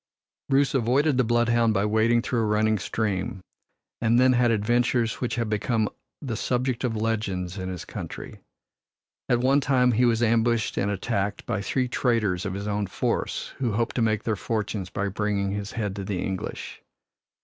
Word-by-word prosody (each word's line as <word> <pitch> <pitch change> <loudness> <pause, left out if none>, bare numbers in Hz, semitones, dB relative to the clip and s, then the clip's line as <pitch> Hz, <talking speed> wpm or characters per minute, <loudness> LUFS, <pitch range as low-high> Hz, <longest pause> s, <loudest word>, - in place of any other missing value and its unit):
Bruce 135 -1 +3
avoided 135 +3 +2
the 130 - +4
bloodhound 120 -1 +2
by 100 +1 +2
wading 110 +2 +3
through 120 -1 -1
a 110 - +1
running 110 0 +2
stream, 95 -2 -2 0.6
and 115 +1 +3
then 130 0 +5
had 120 -1 +3
adventures 120 +2 +1
which 125 - -1
have 115 -1 -1
become 110 +1 0 0.4
the 120 -5 -3
subject 125 +2 -1
of 120 -3 0
legends 105 -4 -2
in 95 0 -4
his 90 -2 -6
country. - - -7 0.9
At 120 -1 +3
one 135 +3 +4
time 125 -2 +3
he 120 +2 +3
was 115 -1 +2
ambushed 115 0 +2
and 100 - 0
attacked 100 0 -2
by 110 -4 -2
three 125 +5 0
traitors 110 -7 0
of 95 - -4
his 100 +1 -4
own 105 -1 -1
force, - - -2
who 120 -5 0
hoped 115 +2 -1
to - - +2
make 110 -1 +1
their 110 - 0
fortunes 105 -3 -3
by 100 +1 -2
bringing 100 0 -1
his 100 0 -4
head 105 -4 -2
to 100 - -3
the 95 -1 -3
English. 95 0 -5
110 Hz, 180 wpm, -25 LUFS, 100-120 Hz, 0.9 s, then